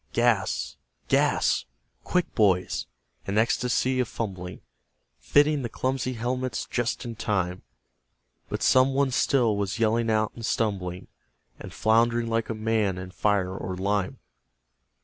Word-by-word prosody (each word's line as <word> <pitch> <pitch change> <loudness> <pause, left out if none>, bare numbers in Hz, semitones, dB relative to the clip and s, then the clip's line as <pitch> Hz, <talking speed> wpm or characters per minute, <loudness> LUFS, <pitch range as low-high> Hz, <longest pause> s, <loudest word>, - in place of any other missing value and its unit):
Gas! 115 -5 +1 0.3
GAS! - - +2 0.4
Quick, 180 -1 0
boys! 95 -5 +2 0.4
An 100 +2 -1
ecstasy 125 +3 +1
of 125 - +1
fumbling, 95 -6 -5 0.6
Fitting 145 - +3
the 120 - -3
clumsy 130 0 -2
helmets 125 0 -2
just 120 +1 -1
in 115 -1 -5
time; 95 -5 -1 0.9
But - - -3
someone 135 +1 +4
still 125 -3 +2
was 100 0 -2
yelling 115 0 +2
out 110 -1 +1
and 115 - -10
stumbling 95 -6 -1 0.5
And - - -9
flound'ring 115 +1 +2
like 115 0 -1
a 115 - -2
man 110 -3 0
in 90 0 -7
fire 95 -1 0
or 95 -1 -5
lime... 100 0 -1
115 Hz, 130 wpm, -26 LUFS, 100-120 Hz, 0.9 s, someone